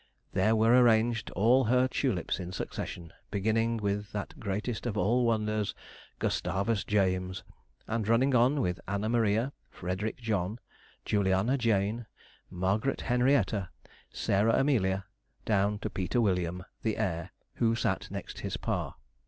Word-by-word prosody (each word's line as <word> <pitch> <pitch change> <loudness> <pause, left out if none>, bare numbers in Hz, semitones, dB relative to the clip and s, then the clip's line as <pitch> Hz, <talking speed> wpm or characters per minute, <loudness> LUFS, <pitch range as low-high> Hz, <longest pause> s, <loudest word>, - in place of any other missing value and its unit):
There 105 +4 +3
were 115 +2 +5
arranged 115 -2 +4
all 120 +5 +4
her 125 +3 +3
tulips 125 -10 -1
in 90 -1 -5
succession, 85 -2 -5 0.2
beginning 115 +3 +1
with 105 -1 -2
that 105 -2 -5
greatest 105 +4 -3
of 110 -3 -2
all 120 +6 +2
wonders, 110 -2 0 0.4
Gustavus 100 +4 0
James, 95 -2 0 0.4
and 110 -2 -1
running 125 +4 +3
on 130 +4 +4
with 90 -5 -1
Anna 100 +3 -1
Maria, 115 +3 +1 0.2
Frederick 95 +5 -3
John, 105 -3 -1 0.5
Juliana 100 +4 +2
Jane, 110 -2 0 0.4
Margaret 95 +8 0
Henrietta, 125 -6 +2 0.4
Sarah 105 +3 +2
Amelia, 100 -9 +1 0.4
down 105 -1 +2
to 105 - -4
Peter 95 +5 -1
William, 90 -4 0 0.2
the 110 -2 -1
heir, 85 -2 -2 0.3
who 115 -1 +2
sat - - -1
next - - -6
his - - -3
pa. - - -2
105 Hz, 130 wpm, -30 LUFS, 95-115 Hz, 0.5 s, were